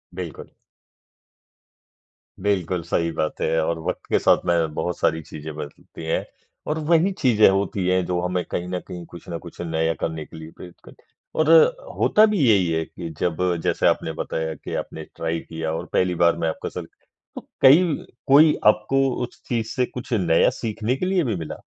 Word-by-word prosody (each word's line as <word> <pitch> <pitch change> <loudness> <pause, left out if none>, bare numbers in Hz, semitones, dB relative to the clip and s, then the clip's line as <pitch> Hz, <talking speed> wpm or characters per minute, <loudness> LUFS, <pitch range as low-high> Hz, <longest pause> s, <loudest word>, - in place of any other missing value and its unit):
बिल्कुल। 90 -4 -7 2.0
बिल्कुल 95 -3 0
सही 85 0 0
बात 80 -1 -3
है 80 - +1
और 80 +1 -1
वक़्त - - -4
के - - +3
साथ - - +4
में 85 -3 +1
बहुत 90 +1 -2
सारी 80 +1 +1
चीज़ें 75 +1 -8
बदलती 75 +2 -9
हैं 80 - -1 0.4
और 155 +1 -1
वही 170 +3 +4
चीज़ें 110 -5 +5
होती 95 -1 0
हैं 95 -1 +2
जो 90 0 -1
हमें 90 0 -1
कहीं 90 - -2
न 90 0 -2
कहीं 90 -1 -7
कुछ 85 0 -13
ना 85 - -3
कुछ 85 - -12
नया 80 -1 0
करने 80 -1 -3
के - - -13
लिए 80 0 -10
प्रेरित 90 -1 -11
करती - - -17
हैं। - - -42 0.3
और 155 - 0 0.5
होता 215 - +5
भी 210 -3 0
यही 95 -4 +4
है 80 0 0
कि 85 -2 -8
जब 85 -3 0 0.3
जैसे - - +2
आपने - - +1
बताया 80 0 -3
कि - - -8
आपने - - -9
ट्राई 85 0 -2
किया 80 -1 -5
और 80 - -4
पहली 90 -1 +2
बार 85 0 +3
में 80 - +2
आपका - - -5
सग - - -7 0.7
कई 145 +7 +8 0.4
कोई 150 +3 +7
आपको 135 +6 +3
उस 120 - -8
चीज़ 115 -3 -1
से 125 -1 +2
कुछ 125 +1 -7
नया 85 -7 +3
सीखने 115 +2 -2
के 185 - -3
लिए 185 -2 +2
भी 115 -6 -1
मिला? 80 -3 -6
90 Hz, 190 wpm, -23 LUFS, 80-115 Hz, 2.0 s, कई